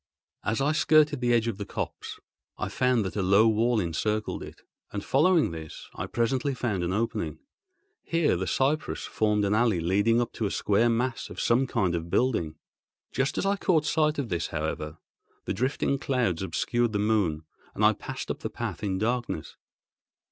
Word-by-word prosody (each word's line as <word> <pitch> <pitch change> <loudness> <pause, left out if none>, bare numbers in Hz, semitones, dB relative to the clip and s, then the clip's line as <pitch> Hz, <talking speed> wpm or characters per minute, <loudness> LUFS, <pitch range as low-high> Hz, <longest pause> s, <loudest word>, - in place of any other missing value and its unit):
As 110 +5 0
I 145 +2 +2
skirted 150 -2 +4
the 120 -1 +2
edge 115 -1 +3
of 110 -3 -3
the 100 - -3
copse, - - -5 0.4
I - - -3
found 125 -4 +1
that 95 - -4
a 105 - 0
low 100 +4 +5
wall 115 +2 +2
encircled 105 +5 -1
it, - - -10 0.3
and 100 -1 -5
following 160 - +3
this 80 -2 -9
I 95 - -5
presently 130 +6 0
found 105 -8 -1
an 85 - -1
opening. 115 +4 -2 0.6
Here 165 - +1
the 90 +1 -2
cypresses 140 - 0
formed 105 -1 +1
an 100 - +1
alley 110 -4 +3
leading 100 +7 +2
up 120 0 -1
to 110 - -1
a - - -3
square 105 +5 +2
mass 120 +2 -1
of - - -8
some 125 +3 +2
kind 90 -7 0
of 85 0 -3
building. 85 -10 +1 0.6
Just 135 +2 -1
as - - 0
I 200 +1 +2
caught 165 -6 +2
sight 155 0 +2
of 135 -5 -2
this, 85 -2 -1
however, 75 0 -4 0.5
the - - -1
drifting 135 +4 0
clouds 120 -13 0
obscured 120 +4 0
the - - +1
moon, 100 -7 +1 0.3
and - - +2
I - - +6
passed - - -6
up - - -5
the - - -4
path - - -5
in 95 -2 0
darkness. 120 +4 -2
115 Hz, 185 wpm, -27 LUFS, 95-130 Hz, 0.6 s, I